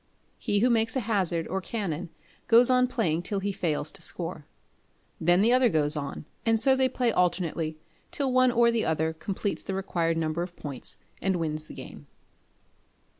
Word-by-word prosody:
He 205 Hz, -1 st, 0 dB
who 250 Hz, +2 st, +4 dB
makes 225 Hz, +1 st, +1 dB
a 260 Hz, -, +1 dB
hazard 185 Hz, -7 st, 0 dB
or 190 Hz, +2 st, -3 dB
canon 185 Hz, -5 st, -4 dB, 0.4 s
goes 240 Hz, +2 st, +7 dB
on 250 Hz, 0 st, +4 dB
playing 175 Hz, -10 st, 0 dB
till 200 Hz, +3 st, -2 dB
he 200 Hz, +1 st, -2 dB
fails 155 Hz, -5 st, -1 dB
to 195 Hz, -, -5 dB
score. 165 Hz, -3 st, -4 dB, 0.7 s
Then 175 Hz, +4 st, +3 dB
the 235 Hz, +3 st, +4 dB
other 255 Hz, -1 st, +4 dB
goes 150 Hz, -4 st, +4 dB
on, 140 Hz, 0 st, -5 dB, 0.2 s
and 225 Hz, -1 st, +2 dB
so 265 Hz, +3 st, +5 dB
they 260 Hz, 0 st, +2 dB
play 245 Hz, -2 st, 0 dB
alternately 170 Hz, -4 st, -1 dB, 0.3 s
till 270 Hz, -3 st, -2 dB
one 255 Hz, 0 st, +4 dB
or 235 Hz, 0 st, +4 dB
other 160 Hz, -8 st, 0 dB
completes 195 Hz, +4 st, -3 dB
the 195 Hz, -, -4 dB
required 170 Hz, -4 st, -1 dB
number 160 Hz, +1 st, -1 dB
of 175 Hz, 0 st, -6 dB
points, 140 Hz, -4 st, -6 dB, 0.2 s
and 190 Hz, -1 st, +1 dB
wins 155 Hz, -2 st, -2 dB
the -, -, -12 dB
game. -, -, -11 dB
190 Hz, 175 wpm, -27 LUFS, 160-230 Hz, 0.7 s, goes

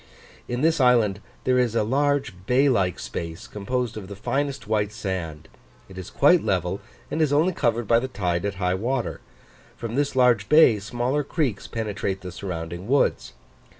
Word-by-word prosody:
In 120 Hz, +1 st, -3 dB
this 160 Hz, -1 st, +3 dB
island 115 Hz, -6 st, +4 dB, 0.2 s
there 125 Hz, 0 st, +2 dB
is 120 Hz, -3 st, +1 dB
a 115 Hz, -, +2 dB
large 140 Hz, +1 st, +1 dB
bay 135 Hz, +3 st, +4 dB
like 95 Hz, -8 st, +1 dB
space, 85 Hz, +6 st, -6 dB
composed 115 Hz, +3 st, -3 dB
of 100 Hz, -3 st, -7 dB
the 100 Hz, -, -8 dB
finest 135 Hz, +4 st, -2 dB
white 105 Hz, -1 st, 0 dB
sand: 85 Hz, -7 st, -5 dB, 0.4 s
it 95 Hz, -, -13 dB
is 95 Hz, -2 st, -7 dB
quite -, -, +4 dB
level -, -, -1 dB, 0.3 s
and 160 Hz, -, -1 dB
is 155 Hz, -3 st, +2 dB
only 160 Hz, +6 st, +3 dB
covered 115 Hz, -6 st, 0 dB
by 115 Hz, +2 st, +5 dB
the 130 Hz, -, -3 dB
tide 90 Hz, -8 st, -2 dB
at 100 Hz, -1 st, -2 dB
high 90 Hz, -1 st, 0 dB
water; 120 Hz, +8 st, -2 dB, 0.6 s
from 115 Hz, -1 st, -5 dB
this 140 Hz, +1 st, 0 dB
large 125 Hz, -5 st, +3 dB
bay 150 Hz, -8 st, +6 dB
smaller 120 Hz, +7 st, -1 dB
creeks 135 Hz, -, -2 dB
penetrate 100 Hz, -3 st, -3 dB
the 90 Hz, -, -7 dB
surrounding 85 Hz, 0 st, -6 dB
woods. 135 Hz, -, +1 dB
115 Hz, 175 wpm, -24 LUFS, 95-130 Hz, 0.6 s, bay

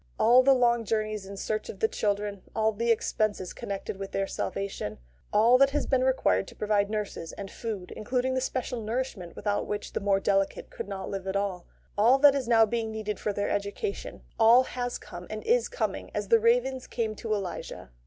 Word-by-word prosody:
All 245 Hz, +3 st, +6 dB
the 270 Hz, +1 st, +5 dB
long 240 Hz, -2 st, +3 dB
journeys 215 Hz, -2 st, -2 dB
in 200 Hz, 0 st, -8 dB
search 215 Hz, +2 st, -3 dB
of 195 Hz, -, -7 dB
the 220 Hz, -, +3 dB
children, 205 Hz, -2 st, -2 dB
all 220 Hz, 0 st, +2 dB
the 230 Hz, +2 st, -2 dB
expenses 215 Hz, -4 st, 0 dB
connected 195 Hz, 0 st, -5 dB
with 195 Hz, 0 st, -6 dB
their 195 Hz, -, 0 dB
salvation, 195 Hz, -, -4 dB, 0.3 s
all 230 Hz, +4 st, +5 dB
that 275 Hz, 0 st, +6 dB
has 295 Hz, +1 st, -1 dB
been 260 Hz, -1 st, +2 dB
required 260 Hz, -6 st, +2 dB
to -, -, -12 dB
provide 205 Hz, -1 st, +1 dB
nurses 210 Hz, -6 st, -4 dB
and 195 Hz, -1 st, -7 dB
food 210 Hz, -6 st, -5 dB
(including 250 Hz, +4 st, -1 dB
the 260 Hz, -, 0 dB
special 255 Hz, -2 st, -2 dB
nourishment 220 Hz, -6 st, -4 dB
without 205 Hz, -1 st, -1 dB
which 205 Hz, 0 st, -4 dB
the -, -, -1 dB
more 195 Hz, -1 st, +2 dB
delicate 195 Hz, -, 0 dB
could -, -, -6 dB
not 190 Hz, -1 st, -5 dB
live 195 Hz, -1 st, -5 dB
at 190 Hz, -, -2 dB
all), 195 Hz, -3 st, -2 dB, 0.3 s
all 240 Hz, +6 st, +6 dB
that 285 Hz, 0 st, +7 dB
is 270 Hz, -4 st, -2 dB
now 225 Hz, -2 st, +6 dB
being 225 Hz, 0 st, -2 dB
needed 215 Hz, -2 st, -4 dB
for 210 Hz, -, -1 dB
their 205 Hz, 0 st, -2 dB
education 205 Hz, -, -3 dB, 0.2 s
all 230 Hz, +3 st, +7 dB
has 245 Hz, -1 st, -3 dB
come -, -, -10 dB
and -, -, -5 dB
is 470 Hz, +2 st, +2 dB
coming -, -, -3 dB
as -, -, -2 dB
the 460 Hz, -, +6 dB
ravens 450 Hz, -, +2 dB
came 225 Hz, -2 st, -2 dB
to 220 Hz, +1 st, -6 dB
Elijah. 185 Hz, -, -4 dB
215 Hz, 205 wpm, -28 LUFS, 200-255 Hz, 0.3 s, that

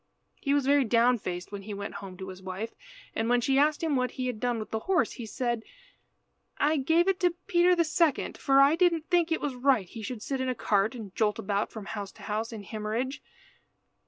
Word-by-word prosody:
He 280 Hz, 0 st, +1 dB
was 285 Hz, -2 st, +1 dB
very 280 Hz, 0 st, +4 dB
down 240 Hz, +1 st, +3 dB
faced 180 Hz, -1 st, -5 dB
when 200 Hz, -1 st, -5 dB
he 205 Hz, +1 st, -6 dB
went 200 Hz, 0 st, -5 dB
home 190 Hz, -2 st, -9 dB
to 190 Hz, +1 st, -7 dB
his 185 Hz, 0 st, -9 dB
wife, 190 Hz, +4 st, -5 dB, 0.4 s
and 225 Hz, +1 st, -1 dB
when 245 Hz, 0 st, +4 dB
she 270 Hz, +3 st, +2 dB
asked 300 Hz, +2 st, +2 dB
him 315 Hz, -3 st, +1 dB
what 250 Hz, -1 st, +1 dB
he 255 Hz, -, -1 dB
had 250 Hz, -4 st, -3 dB
done 245 Hz, 0 st, 0 dB
with 215 Hz, -, -6 dB
the 220 Hz, -, -1 dB
horse, 375 Hz, -3 st, +3 dB
he 235 Hz, -3 st, -7 dB
said 240 Hz, 0 st, -2 dB, 1.0 s
"I 305 Hz, +2 st, +2 dB
gave 325 Hz, +6 st, +3 dB
it 385 Hz, 0 st, +2 dB
to 355 Hz, -3 st, +2 dB
Peter 355 Hz, +1 st, +4 dB
the 340 Hz, -, +3 dB
second, 315 Hz, -2 st, +1 dB
for 275 Hz, 0 st, +3 dB
I 280 Hz, +3 st, +6 dB
didn't 335 Hz, -1 st, +1 dB
think 345 Hz, -2 st, +3 dB
it 320 Hz, -, +1 dB
was 290 Hz, -2 st, -2 dB
right 250 Hz, -4 st, +2 dB
he 225 Hz, +5 st, -9 dB
should 220 Hz, 0 st, -5 dB
sit 270 Hz, -2 st, -2 dB
in 260 Hz, -, -1 dB
a 255 Hz, -, -1 dB
cart 210 Hz, +2 st, +1 dB
and 210 Hz, -6 st, -9 dB
jolt 210 Hz, -2 st, +1 dB
about 200 Hz, +1 st, -1 dB
from 220 Hz, -3 st, -8 dB
house 205 Hz, -2 st, -5 dB
to -, -, -15 dB
house 220 Hz, +2 st, -2 dB
in 220 Hz, -3 st, -7 dB
Himmerige. 220 Hz, +6 st, -3 dB
245 Hz, 235 wpm, -28 LUFS, 215-290 Hz, 1.0 s, I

